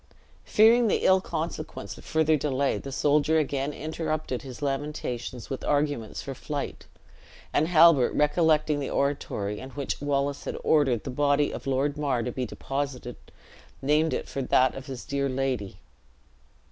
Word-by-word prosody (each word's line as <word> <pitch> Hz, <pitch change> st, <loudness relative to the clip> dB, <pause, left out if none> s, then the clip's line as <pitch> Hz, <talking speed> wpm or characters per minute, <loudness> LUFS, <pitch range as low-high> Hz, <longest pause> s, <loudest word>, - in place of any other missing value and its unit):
Fearing 230 Hz, +2 st, +5 dB
the -, -, +1 dB
ill 190 Hz, 0 st, +5 dB
consequence 160 Hz, -2 st, -5 dB
of -, -, -13 dB
further 160 Hz, 0 st, +2 dB
delay, 140 Hz, -1 st, 0 dB
the 135 Hz, -, -7 dB
soldier 150 Hz, +3 st, +2 dB
again 140 Hz, -2 st, 0 dB
interrupted 155 Hz, -3 st, -3 dB
his 130 Hz, +1 st, -9 dB
lamentations 135 Hz, -4 st, -4 dB
with 135 Hz, -, -4 dB
arguments 145 Hz, -6 st, -1 dB
for 135 Hz, -, -5 dB
flight; 145 Hz, +2 st, -5 dB, 0.7 s
and 155 Hz, -, +2 dB
Halbert 165 Hz, -6 st, +6 dB
recollecting 150 Hz, -1 st, +3 dB
the 140 Hz, -, -3 dB
oratory 105 Hz, -7 st, -1 dB
in 130 Hz, -, -8 dB
which 140 Hz, +1 st, -4 dB
Wallace 140 Hz, 0 st, -1 dB
had -, -, -4 dB
ordered 135 Hz, -7 st, +3 dB
the -, -, -5 dB
body 145 Hz, +2 st, +2 dB
of -, -, -7 dB
Lord 140 Hz, +2 st, 0 dB
Mar 135 Hz, -5 st, 0 dB
to 125 Hz, -, -3 dB
be 125 Hz, 0 st, -3 dB
deposited, 135 Hz, -1 st, -4 dB, 0.6 s
named 150 Hz, +3 st, +2 dB
it -, -, -3 dB
for 135 Hz, -, -4 dB
that 130 Hz, 0 st, +3 dB
of 135 Hz, +1 st, -9 dB
his 130 Hz, -3 st, -7 dB
dear 140 Hz, 0 st, -1 dB
lady. 130 Hz, -7 st, -2 dB
140 Hz, 155 wpm, -27 LUFS, 130-150 Hz, 0.7 s, Halbert